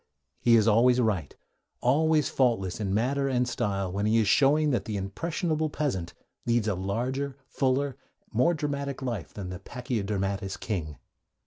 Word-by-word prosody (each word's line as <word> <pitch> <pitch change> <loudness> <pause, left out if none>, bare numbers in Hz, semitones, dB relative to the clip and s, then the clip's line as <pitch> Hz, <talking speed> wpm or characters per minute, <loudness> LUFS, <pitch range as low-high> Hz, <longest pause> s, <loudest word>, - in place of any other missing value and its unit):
He 120 -1 +5
is 110 -1 +4
always 120 +3 +5
right, 100 - 0 0.4
always 150 +4 +3
faultless 115 -9 +1
in 100 -3 -2
matter 135 +7 +1
and 125 -1 +1
style, 100 -5 -1
when 100 +3 -1
he 110 +1 +3
is 110 -3 +3
showing 150 +6 +4
that 115 -7 0
'the 105 -2 -3
impressionable 155 - -2
peasant 110 - -2 0.3
leads 115 -2 +2
a 105 - +2
larger, 125 +9 -2
fuller, 135 0 0 0.4
more 145 +10 +3
dramatic 140 -2 -3
life 115 - -3
than 95 -3 -6
the 90 0 -6
pachydermatous 100 -5 -3
king.' 80 -9 -3
115 Hz, 150 wpm, -28 LUFS, 100-140 Hz, 0.4 s, He